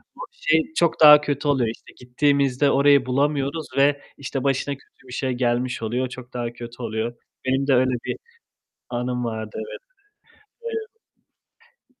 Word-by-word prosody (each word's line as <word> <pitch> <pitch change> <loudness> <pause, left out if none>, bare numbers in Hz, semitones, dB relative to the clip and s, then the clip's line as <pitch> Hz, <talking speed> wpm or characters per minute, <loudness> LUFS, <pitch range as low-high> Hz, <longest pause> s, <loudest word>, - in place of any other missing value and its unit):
o - - -20
şey 160 +1 +2
çok 170 -1 +1
daha 150 -1 +10
kötü 145 0 -2
oluyor 130 -5 +2
işte. - - -18
Gittiğimizde 140 +1 +2
orayı 140 -1 +5
bulamıyoruz 140 +3 0
ve 140 +1 +3 0.2
işte 135 -1 -4
başına 140 +1 0
kötü 130 - -25
bir 125 - -10
şey 130 0 -1
gelmiş 125 0 -1
oluyor, 125 +3 -1
çok 125 0 -10
daha 120 -1 -3
kötü 120 +1 -9
oluyor. 115 +1 -3 0.3
Benim 135 +2 +1
de 135 - +4
öyle 130 0 +3
bir - - -3 0.7
anım 125 0 -2
vardı, 110 -2 -4
evet. 110 - -6 2.1
Eee - - -64
130 Hz, 150 wpm, -23 LUFS, 120-140 Hz, 2.1 s, daha